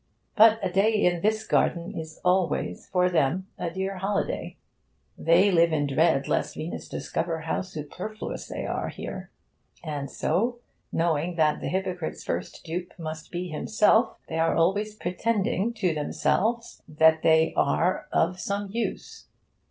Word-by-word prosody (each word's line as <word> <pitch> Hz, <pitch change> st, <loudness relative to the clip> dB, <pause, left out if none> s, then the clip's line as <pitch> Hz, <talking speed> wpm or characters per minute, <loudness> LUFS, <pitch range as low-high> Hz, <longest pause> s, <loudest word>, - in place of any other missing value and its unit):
But 225 Hz, 0 st, +7 dB
a 185 Hz, -, 0 dB
day 195 Hz, +4 st, +3 dB
in 175 Hz, -5 st, +2 dB
this 220 Hz, +2 st, +1 dB
garden 170 Hz, -4 st, +1 dB
is 160 Hz, -1 st, -7 dB
always 180 Hz, -, +1 dB
for 180 Hz, -1 st, +2 dB
them 175 Hz, +1 st, +1 dB
a 175 Hz, -, -1 dB
dear 190 Hz, +2 st, -3 dB
holiday. 195 Hz, +2 st, -2 dB, 0.6 s
They 175 Hz, +5 st, +4 dB
live 170 Hz, -1 st, +4 dB
in 150 Hz, -2 st, +1 dB
dread 140 Hz, 0 st, +2 dB
lest -, -, 0 dB
Venus 160 Hz, +2 st, -5 dB
discover 165 Hz, -1 st, -3 dB
how 160 Hz, -, -1 dB
superfluous 185 Hz, +4 st, -6 dB
they -, -, -5 dB
are -, -, -2 dB
here. -, -, -7 dB, 0.5 s
And 145 Hz, -4 st, -4 dB
so, 235 Hz, -, 0 dB, 0.3 s
knowing 165 Hz, +1 st, 0 dB
that 155 Hz, -2 st, +2 dB
the -, -, -3 dB
hypocrite's 185 Hz, -3 st, -3 dB
first -, -, -4 dB
dupe 175 Hz, +2 st, -5 dB
must 155 Hz, -2 st, -7 dB
be 180 Hz, 0 st, -4 dB
himself, 215 Hz, +8 st, +2 dB
they 160 Hz, -, -3 dB
are 165 Hz, -, +2 dB
always 205 Hz, +6 st, +1 dB
pretending 215 Hz, +3 st, 0 dB
to 185 Hz, -7 st, +1 dB
themselves 220 Hz, +9 st, -1 dB
that 160 Hz, +1 st, +4 dB
they 160 Hz, 0 st, +4 dB
are 180 Hz, +3 st, +1 dB
of 185 Hz, -, +1 dB
some 200 Hz, -2 st, -3 dB
use. 230 Hz, +2 st, -4 dB
180 Hz, 145 wpm, -26 LUFS, 160-200 Hz, 0.6 s, But